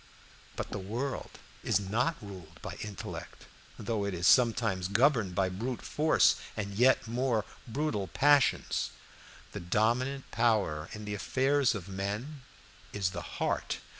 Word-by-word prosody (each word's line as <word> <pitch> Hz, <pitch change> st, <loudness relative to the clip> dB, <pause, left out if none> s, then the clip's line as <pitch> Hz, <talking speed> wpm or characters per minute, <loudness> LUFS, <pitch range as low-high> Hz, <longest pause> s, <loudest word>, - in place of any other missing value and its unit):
But -, -, -5 dB
the 100 Hz, -, -3 dB
world 120 Hz, +8 st, -4 dB, 0.3 s
is -, -, +2 dB
not 115 Hz, +11 st, 0 dB
ruled 90 Hz, -5 st, -10 dB
by -, -, -5 dB
intellect, 105 Hz, -3 st, -7 dB, 0.3 s
though 110 Hz, -1 st, -2 dB
it 100 Hz, -2 st, -2 dB
is 85 Hz, +1 st, -2 dB
sometimes 115 Hz, -5 st, +4 dB
governed 110 Hz, -3 st, +3 dB
by 95 Hz, 0 st, +2 dB
brute 115 Hz, +7 st, -4 dB
force 155 Hz, +1 st, +3 dB, 0.2 s
and 100 Hz, -2 st, -3 dB
yet 125 Hz, +4 st, +4 dB
more 120 Hz, -3 st, 0 dB, 0.2 s
brutal 115 Hz, -6 st, -1 dB
passions. 145 Hz, +3 st, +3 dB, 0.6 s
The -, -, -5 dB
dominant 120 Hz, +9 st, 0 dB
power 105 Hz, -10 st, +1 dB
in 105 Hz, 0 st, -7 dB
the 105 Hz, -, -3 dB
affairs 135 Hz, +4 st, +2 dB
of 95 Hz, -3 st, -6 dB
men 105 Hz, +10 st, -4 dB, 0.5 s
is 100 Hz, -3 st, -1 dB
the 90 Hz, -2 st, -5 dB, 0.2 s
heart. -, -, -1 dB
110 Hz, 135 wpm, -31 LUFS, 95-130 Hz, 0.6 s, sometimes